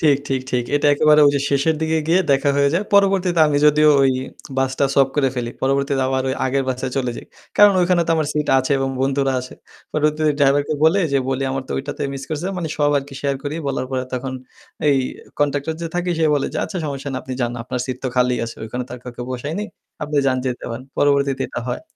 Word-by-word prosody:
ঠিক, 145 -3 +4
ঠিক, 135 -1 0
ঠিক। 125 -1 0
এটা 145 - +1
একেবারে 150 +1 +5 0.3
শেষের 140 +3 +2
দিকে 160 0 +1
গিয়ে 180 +3 +4
দেখা 140 +1 +2
হয়ে 140 0 +4
যায়। 195 +5 +1
পরবর্তীতে 195 -4 +3
আমি 145 -1 +1
যদিও 150 +1 +5
ওই 135 - +4 0.5
বাসটা 135 +1 +1
সয়াপ 135 -1 +4
করে 135 -2 +3
ফেলি। 120 -1 -3
পরবর্তীতে 135 0 +1
আবার 130 0 0
ওই 130 - 0
আগের 135 +1 0
বাসায় 130 0 -3
চলে 130 -2 0
যাই। - - -9 0.3
কারণ 205 -1 +7
ওখানে 175 -1 +3
তো - - -1
আমার 155 -2 0
সিট 150 0 -1
আছে 130 +2 -2
এবং 135 - 0
বন্ধুরা 135 0 +1
আছে 130 - -10 0.4
পরবর্তিতে 155 0 +1
ড্রাইভারকে 145 +1 +2
বলে 175 +5 +4
যে 140 - +4
বলি 135 0 -1
আমার 135 0 -2
তো - - -3
ঐটাতে 140 +2 -4
মিস 135 - -6
করছে। 155 +3 -3
মানে 165 -3 -3
সব 145 -1 +2
আরকি 140 0 -8
শেয়ার 140 -1 -1
করি। 145 +1 -4
বলার 135 -2 -2
পরে 130 -1 -1
তখন 130 +1 -4 0.6
এই 140 - +4 0.4
কনট্যাক্টর 145 +2 0
যে - - -2
থাকি 175 0 -1
সে 160 - +2
বলে 140 - 0
যে - - -3
আচ্ছা 190 - -5
সমস্যা 140 -1 -5
না। - - -3
আপনি 130 - -7
যান। 120 0 0
আপনার 125 +1 -4
সিট 130 -2 -3
তো - - +1
খালিই 125 0 +2
আছে। 115 - -8
ওখানে 125 +3 -4
তো - - -24
আর 125 - -11
কাউকে 120 0 -7
বসাইনি। 145 +11 -3 0.4
আপনি 150 0 -3
যান 130 - +2
যেতে 125 -1 -3
পারেন। 120 +3 -6
পরবর্তীতে 140 -2 +2
এটা - - -5
হয়। - - -3
140 Hz, 225 wpm, -20 LUFS, 130-150 Hz, 0.6 s, কারণ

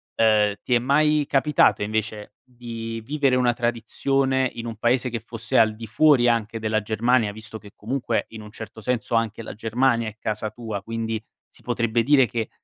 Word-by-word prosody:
ehm, 105 -2 +3
ti 125 - -1
è 120 - +5
mai 150 +3 +2
capitato 140 -5 +3
invece 110 0 -3 0.2
di 115 -2 -7
vivere 140 0 +1
una 125 -1 +2
tradizione 130 +3 0
in 115 0 -6
un 115 - -5
paese 120 +3 +1
che 115 - -3
fosse 115 0 -3
al 110 -1 +5
di 115 0 -8
fuori 125 0 +4
anche 115 -1 -1
della 110 0 0
Germania, 110 +1 +1
visto 110 +1 -8
che 105 -2 -14
comunque 120 +1 -2
in 110 -1 -9
un 105 - -12
certo 110 0 -10
senso 120 0 -1
anche 115 -1 0
la 110 - -8
Germania 115 +1 +1
è 110 - -14
casa 105 -1 -3
tua, 110 -3 -6
quindi 115 0 -3 0.3
si - - -21
potrebbe 115 -1 0
dire 135 -1 +4
che 115 +1 -3
115 Hz, 185 wpm, -23 LUFS, 110-125 Hz, 0.3 s, è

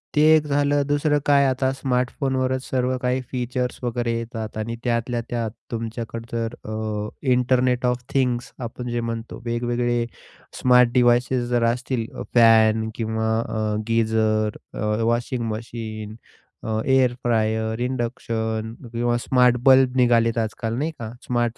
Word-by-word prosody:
ते 150 - +4
एक 155 -1 +2
झालं 145 0 +2
दुसरं 145 0 +2
काय 140 -1 +5
आता 130 0 +1
स्मार्टफोनवरच 130 0 -1
सर्व 130 0 0
काही 125 +1 0
फीचर्स 125 0 -2
वगैरे 120 -1 -1
येतात 115 -2 -6
आणि 115 +2 -3
त्यातल्या 120 0 0
त्यात 115 -2 -2 0.2
तुमच्याकड 115 0 -5
जर 115 0 -2 0.2
अ, 110 -1 -3 0.2
इंटरनेट 125 0 +2
ऑफ 125 0 0
थिंग्स 125 -3 0 0.2
आपण 125 +1 -7
जे 120 0 -1
म्हणतो 115 0 -5
वेगवेगळे 120 0 0 0.6
स्मार्ट 125 -1 +6
डिवाइसेस 120 0 +3
जर 120 -1 +1
असतील 125 -2 -3
अ, - - -5
फॅन 110 -1 +5
किंवा 110 -1 -1
अ, 110 -2 -2
गीझर, 110 -2 +1 0.2
अ, - - -7 0.2
वॉशिंग 120 +1 0
मशीन, 110 -1 -6 0.5
अ, 110 -1 -1
एअर 130 -2 +3
फ्रायर, 110 -1 0
इंडक्शन 115 -3 -3 0.2
किंवा 120 +1 +1
स्मार्ट 125 -1 +4
बल्ब 130 -1 +6
निघालेत 120 -2 +3
आजकाल, 115 0 -2
नाही 155 +3 -1
का, 110 -2 -5 0.2
स्मार्ट 120 -1 0
120 Hz, 135 wpm, -23 LUFS, 115-125 Hz, 0.6 s, स्मार्ट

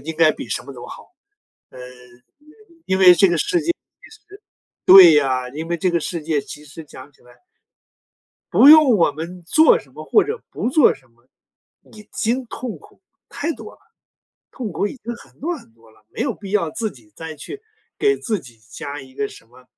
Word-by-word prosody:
个 155 - -7
应 160 - -8
该 155 -1 +4
比 - - -9
什 - - -3
么 140 - -11
都 125 -2 -11
好， - - -13 0.6
呃， - - -14 1.1
因 190 0 -1
为 190 - +4
因 - - +10
为 180 - +8
这 195 - +5
个 170 - 0
世 345 - 0
界 340 +2 0
其 - - -18
实 425 -2 -17 0.4
对 185 -3 +10
呀， 130 -3 0
因 155 +5 -7
为 170 - -1
这 180 +3 0
个 170 - +1
世 165 +1 -5
界 155 -1 -1
其 150 - -11
实 155 +2 -11
讲 145 0 -13
起 - - -30
来 125 - -19 1.2
不 275 - +6
用 305 -5 +8
我 165 - +3
们 170 +4 -8
做 315 - +5
什 - - -18
么 - - -9
或 425 - +3
者 445 +3 -5
不 - - -3
做 275 +2 +4
什 130 - -22
么， 120 +1 -33 0.6
已 210 -1 -15
经 245 +4 -1
痛 240 0 -7
苦 - - -21 0.3
太 320 - -4
多 - - -11
了， - - -20 0.7
痛 235 -6 -6
苦 185 - -2
已 - - -7
经 235 +3 -5
很 - - -19
多 345 +4 -3
很 190 - -17
多 115 0 -23
了， 110 -1 -26
没 - - -9
有 260 -5 -1
必 195 -1 -11
要 195 -6 0
自 220 +5 -3
己 115 - -19
再 160 -1 -8
去 400 - -10 0.4
给 415 -1 +2
自 220 -4 -2
己 120 -8 -16
加 145 +1 -7
一 130 -1 -16
个 210 - -2
什 115 - -15
么 125 +2 -20
175 Hz, 235 characters per minute, -20 LUFS, -, 1.2 s, 因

